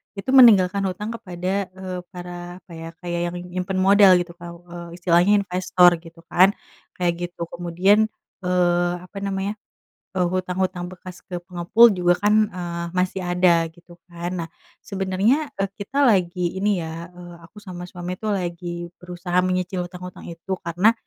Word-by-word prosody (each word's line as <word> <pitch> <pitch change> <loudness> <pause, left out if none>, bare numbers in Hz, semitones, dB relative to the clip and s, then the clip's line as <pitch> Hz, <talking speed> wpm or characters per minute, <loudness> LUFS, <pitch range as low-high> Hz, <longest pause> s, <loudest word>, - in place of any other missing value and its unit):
itu 200 +7 -3
meninggalkan 205 -8 +7
hutang 210 +5 -4
kepada, 190 -3 -3
eee, 185 -1 -5
para 175 -1 -8
apa 175 - -19
ya 165 0 -7
kayak 175 -1 -2
yang - - -8 0.2
nyimpen 185 +1 -2
modal 195 0 +7
gitu 175 -1 -1
Kak 175 -1 -9 0.5
istilahnya 180 +4 +3
investor 180 -1 +4
gitu 165 0 -15
kan 190 +3 +5 0.4
kayak 175 -1 +1 0.2
gitu 170 - -6
kemudian, 185 +5 +2 0.4
eee, 175 -1 +2
apa 180 - -12
namanya, 200 +1 -3 0.5
eee, 180 -2 +1
hutang-hutang 185 -1 -2
bekas 180 -1 -11
ke 175 -1 -6
pengepul 180 +6 +4
juga 175 0 +3
kan, 210 - +4 0.2
eee, 170 -1 -4
masih 185 +1 -1
ada 175 -1 +3
gitu 175 0 -17 0.2
kan 170 +1 -4
nah. - - -10 0.4
Sebenernya, 200 +10 0
eee, 195 0 -1
kita 250 +9 -1
lagi 180 -6 +2
ini 195 -4 +1
ya, 165 +2 -7
eee, 175 -1 -11
aku 190 - -19
sama 180 -1 -7
suami 180 +1 -6
tuh 215 -2 0
lagi 175 -1 -5
berusaha 180 0 -1
menyicil 185 -1 -1
hutang-hutang 180 0 -10
itu 170 +3 -7
karena 175 +6 +3
180 Hz, 155 wpm, -23 LUFS, 175-195 Hz, 0.5 s, meninggalkan